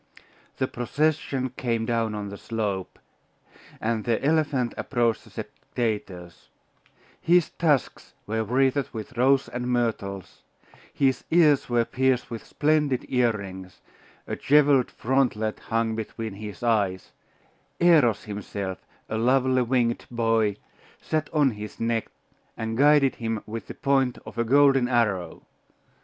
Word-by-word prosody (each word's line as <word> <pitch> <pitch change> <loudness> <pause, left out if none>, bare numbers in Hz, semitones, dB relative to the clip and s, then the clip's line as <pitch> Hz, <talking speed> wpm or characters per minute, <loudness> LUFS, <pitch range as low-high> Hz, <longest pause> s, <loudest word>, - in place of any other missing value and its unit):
The 130 - 0
procession 135 0 -1
came 120 -3 -2
on - - -2
down 110 -3 -1
the 100 - -7
slope, 105 -5 -3 0.8
and 110 -1 -1
the 115 -2 +1
elephant 145 -5 +1
approached 120 -4 0
the - - -16
spectators; 95 -7 -5 0.7
his 175 0 +3
tusks 150 -6 0
were 110 +1 -1
wreathed 130 +4 +1
with 110 +3 -7
roses 130 +3 +3
and 125 0 -4
myrtles; 110 -6 -2 0.5
his 135 -3 +1
ears 155 -6 +4
were 120 -1 +2
pierced 130 0 0
with 115 - -6
splendid 150 -4 +1
earrings, 100 -7 -2 0.5
a - - -4
jewelled 140 -3 +4
frontlet 120 -4 0
hung 115 0 -1
between 110 -1 -5
his 105 +1 -8
eyes; 100 -6 0 0.7
Eros 155 -11 +4
himself, 100 -2 -5 0.3
a 110 - -2
lovely 130 +2 +3
winged 120 -1 0
boy, 115 -3 +1 0.4
sat 155 -1 -2
on 145 -4 +3
his 105 -1 -8
neck, 115 -1 -1 0.5
and 110 0 -3
guided 145 +1 +4
him 115 -2 -3
with 115 +1 -7
the - - -8
point 135 -3 +1
of - - -8
a - - +3
golden 135 +1 +4
arrow. 105 -9 0
120 Hz, 125 wpm, -25 LUFS, 110-135 Hz, 0.8 s, ears